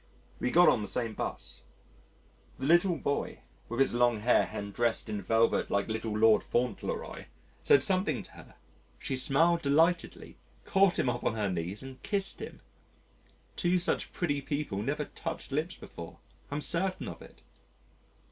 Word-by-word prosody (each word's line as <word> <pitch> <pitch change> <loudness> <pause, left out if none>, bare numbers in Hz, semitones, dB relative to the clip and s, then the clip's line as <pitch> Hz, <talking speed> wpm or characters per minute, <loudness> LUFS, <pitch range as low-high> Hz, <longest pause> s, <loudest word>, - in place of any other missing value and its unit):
We - - 0
got 175 +6 +6
on - - +4
the 105 - -4
same 115 +1 -2
'bus. - - -6 1.0
The 130 - -4
little 175 +3 +4
boy, 140 - -2 0.3
with 120 +2 -4
his 135 - +3
long 120 -2 +2
hair 120 +3 +3
and 100 0 -5
dressed 115 -1 0
in 105 -1 -3
velvet 115 +4 +2
like 100 +2 0
little 110 -1 -2
Lord 110 -1 +5
Fauntleroy, 120 -2 -2 0.4
said 140 - +5
something 190 +1 +1
to - - -15
her - - -15 0.4
she 135 - -3
smiled 165 +6 +3
delightedly, 160 +5 +1 0.3
caught 195 -1 +3
him - - +1
up 125 - -1
on 110 - 0
her 105 -3 -1
knees 90 +6 -3
and 130 -1 -10
kissed 200 -1 -1
him. - - -8 0.9
Two 180 +1 +2
such 180 +1 0
pretty 145 -5 -1
people 140 -8 -3
never 145 +6 -2
touched 165 -1 -6
lips 155 +6 -1
before 85 -1 -10 0.3
I'm 145 +1 -3
certain 185 +4 0
of - - -8
it. - - -15
135 Hz, 160 wpm, -30 LUFS, 110-165 Hz, 1.0 s, got